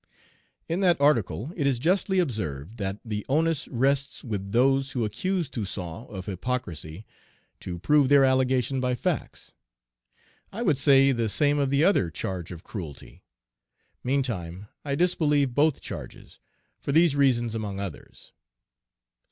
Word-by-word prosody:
In 165 +3 -1
that 180 -5 +3
article 125 - +1
it 145 -5 0
is 135 -3 +2
justly 185 - +1
observed 105 - -2
that 100 -2 -3
the 105 -2 -3
onus 160 +1 +1
rests 135 +2 0
with 100 -5 -4
those 135 +3 +2
who 120 -4 0
accuse 170 - -1
Toussaint 95 - -6
of 95 -5 -7
hypocrisy 90 -4 -4 0.5
to 90 -1 -6
prove 145 - +3
their 140 -1 +6
allegation 130 0 +2
by 125 -1 0
facts. - - -3 1.0
I 230 +4 -4
would 155 - +2
say 135 0 +5
the 115 -3 0
same 145 +6 +2
of 140 -2 +1
the 140 +2 +2
other 165 - +3
charge 90 +1 -5
of 85 -1 -9
cruelty. 80 - -9 0.8
Meantime, 105 -8 -2
I 140 -1 -1
disbelieve 150 -5 +2
both 145 +2 +2
charges, - - -9 0.4
for - - -3
these 160 0 +4
reasons 120 -5 +2
among 105 -3 -4
others. 100 -6 -8
130 Hz, 140 wpm, -26 LUFS, 100-145 Hz, 1.0 s, their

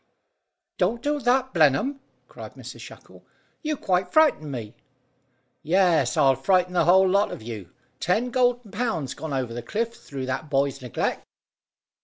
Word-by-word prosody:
"Don't 225 +6 0
do 295 0 0
that, 260 0 +1
Blenheim!" 160 - +3 0.3
cried - - -11
Mrs - - -10
Shackle. - - -13 0.4
"You 305 -2 -2
quite 180 -3 0
frightened 295 - +3
me." 115 -4 -6 0.9
"Yes, 170 -6 +2
I'll 135 -1 +5
frighten 180 +6 +1
the 180 - +2
whole 190 +2 +6
lot 200 +3 +2
of - - -8
you. 105 -6 -8 0.3
Ten 225 +9 0
golden 245 -4 +1
pounds 185 - -2
gone 160 - -7
over 130 -4 -2
the 120 - -5
cliff 230 - -2
through 135 - -7
that 135 +4 -4
boy's 140 0 0
neglect." 125 -2 -2
180 Hz, 150 wpm, -25 LUFS, -, 0.9 s, whole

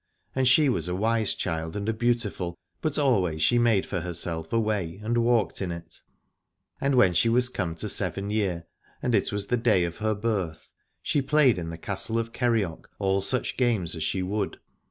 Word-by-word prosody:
And 130 -1 +2
she 145 +4 +6
was 90 - 0
a 90 - -2
wise 110 +1 +1
child 80 0 -3
and 105 0 -3
a 110 - +1
beautiful, 110 -7 -1 0.2
but 155 -2 -1
always 95 - +2
she 120 - +4
made 115 -5 +3
for 90 - -3
herself 80 -1 -3
a 115 - +2
way 100 -5 -1
and 120 +2 +1
walked 115 -3 +1
in 90 -2 -2
it. 85 -1 -8 0.8
And 140 0 +2
when 95 -8 +5
she 100 +7 +3
was 125 +2 +2
come 85 -8 -3
to - - -4
seven 100 +1 -1
year, 95 -6 -1 0.4
and 125 - 0
it 100 - +2
was 100 -1 -2
the 125 - 0
day 115 -6 +3
of 85 0 -3
her 110 0 0
birth, 100 -7 -3 0.3
she 145 - +1
played 135 -6 +3
in 85 -1 -5
the 85 - -6
Castle 100 +6 -1
of 115 0 -2
Kerioc 115 -9 -1
all 95 -1 +1
such 125 +6 -1
games 115 -10 +1
as 80 - -3
she 95 +4 -1
would. 100 +2 -2
105 Hz, 200 wpm, -26 LUFS, 90-120 Hz, 0.8 s, she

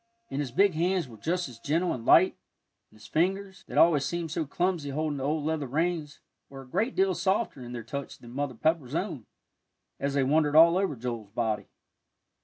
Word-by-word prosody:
And 135 - -2
his 145 -3 -2
big 195 +8 +4
hands 175 +1 0
were 115 - -12
just 175 - -2
as 120 -3 -12
gentle 165 +8 0
and 120 - -6
light, - - +6 0.5
and 110 - -20
his 105 - -15
fingers, 190 +4 -1
that - - -5
always 160 -4 +5
seemed 170 -1 -3
so 155 -1 -2
clumsy 175 -1 -1
holding 150 +1 -2
the 135 - -4
old 150 +1 -1
leather 155 -3 -1
reins, 155 +1 -2 0.3
were 135 -1 -9
a - - -17
great 225 - -1
deal 190 0 +3
softer 190 - 0
in 120 -1 -8
their 120 -2 -5
touch 140 +5 -6
than 120 0 -13
Mother 140 -1 -3
Pepper's 150 +1 0
own, 165 - -3 0.7
as 140 0 -1
they 140 - +3
wandered 150 +2 +2
all 165 +2 +8
over 190 -7 0
Joel's 115 -3 -5
body. 110 -2 -2
150 Hz, 205 wpm, -28 LUFS, 130-170 Hz, 0.7 s, all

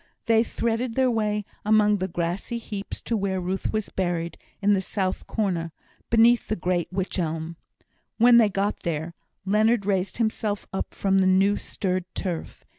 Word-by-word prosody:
They 225 0 +4
threaded 230 +1 -2
their 260 -1 +3
way 210 -2 0 0.2
among 210 -1 +4
the 185 -1 -2
grassy 175 +6 -3
heaps 205 -3 -6
to 235 - -1
where 195 -2 -1
Ruth 185 +2 -2
was 215 -1 -2
buried, 175 -2 -2 0.2
in 205 0 +3
the 195 - +2
south 190 -1 -2
corner, 175 -6 -1 0.4
beneath 230 +1 +5
the 215 - 0
great 175 -2 -1
Wych 190 0 -2
elm. 165 0 -3 0.6
When 235 +1 +7
they 225 -3 +6
got 200 +1 -1
there, 165 0 -3 0.3
Leonard 215 +2 +3
raised 195 -1 0
himself 220 -2 -1
up 190 - -4
from 195 -1 +2
the 190 - +3
new 195 +2 +4
stirred 185 -3 -2
turf. 175 -4 -5
200 Hz, 165 wpm, -25 LUFS, 185-220 Hz, 0.6 s, When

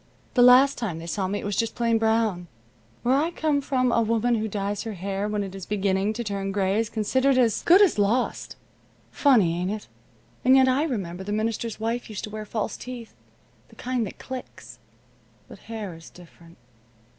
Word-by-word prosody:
The 250 - +3
last 255 +3 +6
time 205 -9 -3
they 165 - -8
saw 185 +3 -2
me 200 +2 -2
it - - -6
was 205 -1 -2
just 230 -1 -1
plain 230 -1 +1
brown. 220 -5 +1 0.6
Where 245 - +3
I 295 +5 +2
come 310 -4 0
from 255 -3 +1
a 235 - +3
woman 230 +2 +1
who 220 -1 0
dyes 205 0 -3
her 225 -2 -5
hair 195 +2 -3
when 210 -1 -1
it 195 -1 -7
is 195 -2 -8
beginning 200 0 0
to 235 +2 -4
turn 200 -2 -3
gray 195 +1 +1
is 225 -1 -1
considered 260 +5 +1
as 235 -4 +2
good 370 +4 +6
as 365 - +2
lost. 220 +5 0 0.6
Funny, 215 - +3
ain't 180 - -1
it? 210 +1 -5 0.6
And 260 +1 +6
yet 265 -1 +6
I 265 +4 +2
remember 190 - -4
the 205 - -5
minister's 220 +1 -2
wife 230 +2 -3
used 210 -3 -6
to 210 - -6
wear 215 0 -6
false 215 0 -3
teeth 245 -3 -9 0.6
the - - -18
kind 245 -3 -2
that - - -10
clicks. 250 - -9 0.7
But - - -13
hair 215 -5 -5
is 165 0 -13
different." 170 -1 -17
220 Hz, 200 wpm, -25 LUFS, 195-245 Hz, 0.7 s, last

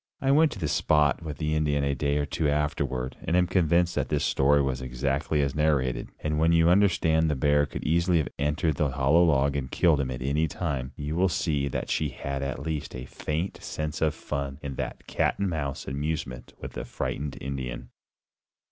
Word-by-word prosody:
I 135 - +2
went 155 +1 +5
to - - -9
the 80 -5 -2
spot 75 -1 +2
with 75 -3 -6
the 75 -1 -1
Indian 75 -2 +1
a 70 0 +1
day 70 +2 0
or 75 - 0
two 75 +1 -1
afterward, 70 -3 -1
and 85 - +1
am 90 - +4
convinced 90 -1 +2
that - - -1
his - - 0
story 70 +2 +3
was 65 -2 0
exactly 70 +4 -1
as 70 -1 -1
narrated. 70 -5 +1
And 75 0 -1
when 80 +1 +4
you 85 0 +5
understand 85 -4 +3
that 75 -2 +1
the - - -7
bear 75 0 +3
could - - -6
easily 85 +2 +2
have 75 -5 +1
entered 75 +1 0
the 75 -1 +1
hollow 70 +6 +3
log 70 -4 +3
and 65 -2 -2
killed 80 -2 +3
him 65 - -2
at 65 0 -4
any 75 +4 +1
time, 70 -7 -3
you 75 +1 -4
will 95 +2 +3
see 75 -5 0
that 70 - -3
she 75 - 0
had 70 +1 -4
at 70 0 -3
least 75 -5 -4
a 65 0 -6
faint 80 +7 -4
sense 75 +1 -4
of 80 -1 +2
fun 70 -2 -4
in 70 -1 -4
that - - -5
"cat - - 0
and 100 -2 -1
mouse" 70 -5 -3
amusement 70 -3 -4
with - - -7
the - - -5
frightened 70 0 -4
Indian. 65 -2 -5
75 Hz, 210 wpm, -27 LUFS, 70-80 Hz, -, went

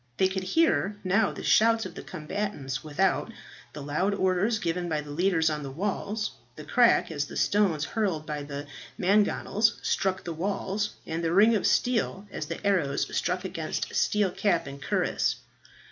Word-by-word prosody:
They 190 - +4
could 190 0 -3
hear 205 - +2
now 195 +4 +2
the - - -8
shouts 225 0 +4
of - - -7
the - - -8
combatants 155 -5 -4
without, 185 +8 0 0.4
the 150 - -7
loud 180 +8 0
orders 190 +4 +1
given 175 -1 -2
by 155 -2 0
the 145 0 -9
leaders 165 0 +2
on 150 -1 0
the 140 - -5
walls, 205 +7 -2 0.2
the 155 - -9
crack, 235 +3 +3
as 145 -2 -1
the - - -8
stones 185 -8 +2
hurled 190 -9 -1
by 150 -1 -4
the 145 0 -6 0.3
mangonels 210 +2 +2
struck 190 -1 0
the 170 - -4
walls, 200 +4 -2
and 165 +1 -3
the 165 - +1
ring 215 +5 +6
of 205 - +1
steel 225 -5 +1
as 150 - -5
the 165 +5 -6
arrows 170 -9 +1
struck 180 +1 -1
against 165 -4 -4
steel 205 -3 +2
cap 185 -2 +1
and 140 0 -9
cuirass. - - 0
185 Hz, 175 wpm, -27 LUFS, 155-205 Hz, 0.4 s, ring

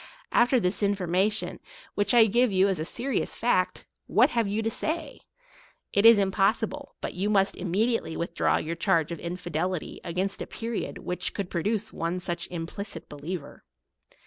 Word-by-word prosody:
After 245 +1 +4
this 180 0 0
in 200 0 +2
formation, 190 +3 0 0.3
which 205 0 +1
I 230 -2 +8
give 240 +2 +3
you 190 0 +4
as 190 -4 0
a 155 - -2
serious 255 +8 -2
fact, 185 -6 +1 0.2
what - - +4
have 230 -3 +1
you 210 +3 -1
to 225 - +1
say? 315 +3 -3 0.7
It 200 +3 +6
is 230 -1 +9
impossible 210 +8 0
but - - -4
you 195 +3 -1
must 195 -2 +3
immediately 195 +1 0
withdraw 170 0 +1
your 165 +2 -3
charge 170 -2 +1
of 170 - -4
infidelity 175 0 -3
against 185 +3 -2
a - - -4
period 230 0 -4
which 180 - -4
could 195 -3 -4
pro 170 - -1
duce 215 +3 -1
one 170 +2 -2
such 175 -1 -3
implicit 175 +1 -6
believer. 150 +2 -7
195 Hz, 170 wpm, -27 LUFS, 175-220 Hz, 0.7 s, is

